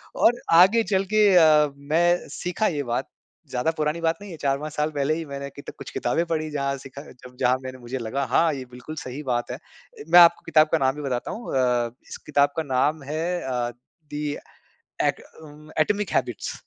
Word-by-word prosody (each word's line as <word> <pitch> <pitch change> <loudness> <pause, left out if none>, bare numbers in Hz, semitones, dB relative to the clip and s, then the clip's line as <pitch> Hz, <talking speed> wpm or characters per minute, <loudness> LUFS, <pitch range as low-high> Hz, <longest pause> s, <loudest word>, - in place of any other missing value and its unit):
और 240 +1 +3
आगे 195 +7 +6
चल 190 -1 +1
के 215 -1 +5
अ, 155 -3 +6
मैं 170 +5 +1
सीखा 180 +5 -2
ये 145 -3 -2
बात, 120 -1 -2 0.4
ज़्यादा 125 +6 0
पुरानी 155 +2 -1
बात 165 0 +1
नहीं 205 -2 -9
है 165 - -8
4-5 145 +2 -2
साल 150 +1 -1
पहले 145 +1 0
ही 165 - -5
मैंने 140 -1 -6
कित 140 - -9
कुछ - - -8
किताबें 165 +8 0
पढ़ी 155 -2 -2
जहाँ 140 -1 -1
सीखा 135 +1 -10
जब 125 0 -15
जहाँ 125 0 +3
मैंने 130 0 -7
मुझे 120 +2 -5
लगा 130 +5 -2
हाँ, 160 +3 +2
ये 130 -2 -6
बिल्कुल 125 +6 -9
सही 135 +4 -7
बात 120 0 -2
है। - - -3 0.4
ए, - - -7
मैं 175 - +8
आपको 170 0 +6
किताब 155 0 +4
का - - +5
नाम 135 -1 +1
भी 150 - -6
बताता 125 -3 -3
हूँ 235 - -6
अ, 120 -2 +1 0.2
इस - - -7
किताब 145 -1 +3
का 160 - 0
नाम 145 +3 0
है 155 +4 -3 0.2
अ, 125 -2 -2 0.4
दी 150 0 -3 0.7
ऍक - - +1 0.2
उम, 150 0 -14
एटॉमिक 205 +5 +1
हैबिट्स। - - -2
150 Hz, 205 wpm, -24 LUFS, 130-165 Hz, 0.7 s, मैं